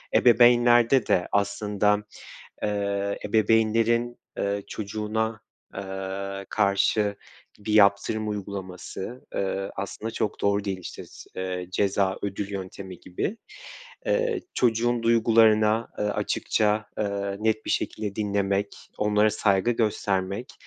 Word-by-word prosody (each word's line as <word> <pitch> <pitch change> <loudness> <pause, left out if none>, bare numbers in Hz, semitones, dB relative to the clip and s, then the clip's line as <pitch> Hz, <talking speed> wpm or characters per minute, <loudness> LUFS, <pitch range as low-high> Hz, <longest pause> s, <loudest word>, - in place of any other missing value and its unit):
ebeveynlerde 120 +1 +5
de 90 - +2
aslında, 105 0 +1 0.7
eee, 100 -1 -1
ebeveynlerin, 115 +3 +2 0.2
eee, 100 0 -1
çocuğuna, 110 +2 -3 0.3
eee, 95 0 -5
karşı 100 0 +2 0.4
bir 105 +1 -4
yaptırım 105 +1 +3
uygulaması, 100 +3 -6
eee, 95 0 -2
aslında 100 +3 -4
çok 110 - -3
doğru 100 0 +1
değil. 95 -2 -2
İşte, 90 - -8
s - - -14
eee, 90 -1 -4
ceza 95 0 +1
ödül 100 0 -3
yöntemi 95 -2 -7
gibi. 170 - -3 0.7
Eee, 485 -5 +1
çocuğun 120 0 +2
duygularına, 115 -1 +4
eee, - - 0
açıkça, 105 +1 0
eee, 100 -1 -2
net 110 0 0
bir - - -2
şekilde 105 -2 -2
dinlemek, 100 -1 -1 0.2
onlara 105 0 +3
saygı 100 0 +2
göstermek, 105 -1 -1
105 Hz, 105 wpm, -26 LUFS, 100-110 Hz, 0.7 s, ebeveynlerde